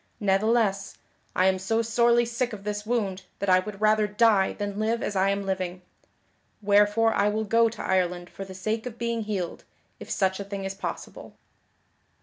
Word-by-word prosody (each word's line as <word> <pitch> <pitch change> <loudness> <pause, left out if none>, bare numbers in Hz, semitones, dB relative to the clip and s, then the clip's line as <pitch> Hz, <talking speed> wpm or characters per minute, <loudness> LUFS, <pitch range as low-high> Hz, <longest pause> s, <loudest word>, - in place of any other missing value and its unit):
Ne'theless, 200 0 +1 0.4
I 185 - +3
am 190 0 +3
so 225 +5 0
sorely 235 +1 +3
sick 240 +1 -2
of 200 -2 -8
this 210 0 -4
wound 200 -6 -1 0.2
that 200 - -2
I 185 - +6
would 195 +1 -7
rather 215 0 +3
die 210 -2 +3
than 205 0 -4
live 225 +2 0
as 205 - -3
I 190 +1 +3
am 200 0 -1
living; 185 -1 -3 0.8
wherefore 210 +2 +3
I 200 +1 +2
will 215 +1 -1
go 230 +2 +3
to 225 - -8
Ireland 180 -1 0
for 195 - -8
the 190 -1 -10
sake 220 +5 -2
of 235 -2 -8
being 235 -1 -2
healed, 190 -5 -4 0.4
if - - -10
such 190 -1 0
a - - -3
thing 200 -1 -6
is 195 - -3
possible." 195 - -7
205 Hz, 185 wpm, -26 LUFS, 195-225 Hz, 0.8 s, I